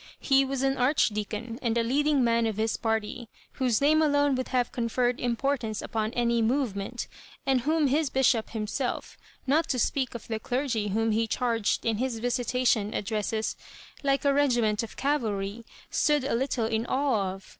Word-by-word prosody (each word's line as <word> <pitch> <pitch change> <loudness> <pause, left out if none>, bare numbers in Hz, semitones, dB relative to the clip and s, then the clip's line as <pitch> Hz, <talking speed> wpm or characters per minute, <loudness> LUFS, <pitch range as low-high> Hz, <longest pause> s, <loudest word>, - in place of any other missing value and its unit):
He 270 -1 +4
was 270 0 -2
an 270 0 +1
Archdeacon, 230 -3 0
and 235 -2 0
a 230 - +2
leading 285 +3 +2
man 230 -1 +2
of 215 -2 -3
his 220 0 0
party, 225 +1 -2 0.2
whose 250 -5 +1
name 310 +2 +4
alone 290 -2 +3
would 255 0 -2
have 250 -2 0
conferred 245 +1 0
importance 240 -2 -1
upon 220 -1 -2
any 235 -1 +1
''movement," 235 -2 -1 0.4
and 265 -2 +2
whom 310 +4 +2
his 285 +2 +2
bishop 255 -4 +2
himself— 225 +4 -3 0.3
not 310 +5 +2
to 255 - 0
speak 255 +1 0
of 235 - -8
the 220 -1 -2
clergy 245 -3 -1
whom 225 +3 +1
he 225 +1 +1
charged 230 -2 0
in 225 -2 +1
his 250 0 -1
visitation 245 -2 0
addresses 215 +1 -2 0.5
like 275 -1 +1
a 280 - +4
regiment 240 -7 +2
of 230 - -8
cavalry 225 -6 -1
— - - -23
stood 295 -2 +2
a 270 - -1
little 245 -1 0
in 225 +1 -1
awe 250 -9 +1
of. 195 0 -14
240 Hz, 175 wpm, -27 LUFS, 220-270 Hz, 0.5 s, He